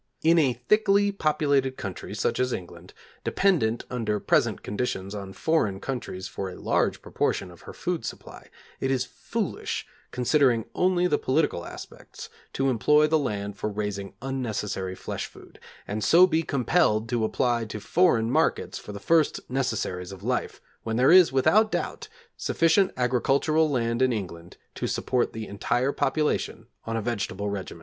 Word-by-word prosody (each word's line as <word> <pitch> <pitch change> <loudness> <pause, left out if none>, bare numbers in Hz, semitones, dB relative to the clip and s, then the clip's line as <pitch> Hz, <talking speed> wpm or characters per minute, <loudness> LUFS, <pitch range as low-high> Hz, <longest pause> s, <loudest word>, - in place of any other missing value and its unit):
In 165 +1 +5
a 135 -5 +3
thickly 200 - +2
populated 145 -7 +1
country, 95 -3 -6
such - - -1
as 125 0 +1
England, 90 -2 -7 0.3
dependent 145 - +1
under 110 -4 -1
present - - +1
conditions 100 -3 -3
on 100 -2 -6
foreign 105 -7 0
countries 105 -7 -5
for 95 - -5
a 90 - -9
large - - 0
proportion 90 - -1
of 85 - -16
her - - -5
food - - -3
supply, - - -8 0.3
it 135 - -1
is 130 -1 +1
foolish, 125 - -4 0.2
considering 125 -2 +2
only 180 -1 +2
the 150 -5 +2
political 135 - 0
aspects, - - -10 0.2
to 135 - 0
employ 150 +6 +4
the 155 +1 +2
land 100 -6 -3
for 105 - -2
raising 100 -1 -4
unnecessary 105 -8 -3
flesh - - -5
food, - - -16 0.3
and 105 +1 -3
so 170 - +7
be 165 -3 +1
compelled 130 -6 +1
to 120 -2 0
apply 120 +1 +1
to 110 0 -6
foreign 115 - +2
markets - - +1
for 105 - -9
the 100 - -7
first 160 +7 +1
necessaries 110 -8 -2
of 95 0 -10
life, 125 +2 -2 0.2
when 115 0 -3
there 130 +4 +5
is, 180 -4 +7
without 210 +12 +4
doubt, 455 - -3 0.3
sufficient 165 +4 +2
agricultural 135 +6 +2
land 115 -3 0
in 130 -1 +4
England 90 -6 -6 0.2
to - - -3
support 125 -2 0
the 110 -1 -6
entire 120 +6 0
population 150 -7 -1 0.2
on 115 0 -2
a 110 - -2
vegetable 100 -3 -2
regimen. 95 -4 -6
125 Hz, 160 wpm, -26 LUFS, 105-150 Hz, 0.3 s, so